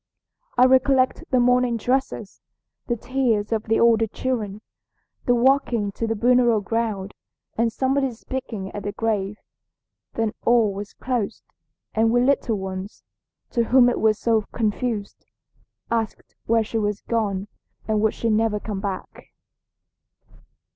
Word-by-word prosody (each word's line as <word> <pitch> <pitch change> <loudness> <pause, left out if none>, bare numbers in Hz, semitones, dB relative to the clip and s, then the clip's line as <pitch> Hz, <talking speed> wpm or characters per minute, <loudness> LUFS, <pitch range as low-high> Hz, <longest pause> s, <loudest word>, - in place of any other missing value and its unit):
"I 250 - +7
recollect 260 +3 +3
the 255 - +3
mourning 250 -1 +3
dresses, 245 -3 -2 0.5
the 240 - 0
tears 235 -4 0
of 220 -1 -1
the 225 0 +2
older 225 -1 +4
children, 215 -3 -3 0.7
the 245 - +4
walking 240 -4 +2
to 225 +3 -3
the 225 - 0
burial 240 0 +4
ground, 205 -2 -2 0.4
and 230 0 +1
somebody's 265 0 0
speaking 225 -7 -5
at 205 - -6
the 205 +1 -4
grave. 210 -2 -1 0.8
Then 225 -2 -1
all 230 -4 +3
was 200 +1 -7
closed, 240 -4 -3 0.5
and 225 +1 +3
we 240 +2 +3
little 255 -4 +1
ones, 190 +1 -6 0.5
to 235 -1 +1
whom 245 +1 +5
it 245 - -1
was 215 -1 +3
so 225 -1 +2
confused, 220 -1 -2 0.7
asked 225 -2 -2
where 230 0 +3
she 225 +1 -2
was 205 -1 -1
gone 205 -4 -1 0.4
and 215 -1 +1
would 220 0 +1
she 230 - 0
never 215 -1 +1
come 205 -2 -5
back. 195 -1 -6
225 Hz, 140 wpm, -23 LUFS, 210-245 Hz, 0.8 s, I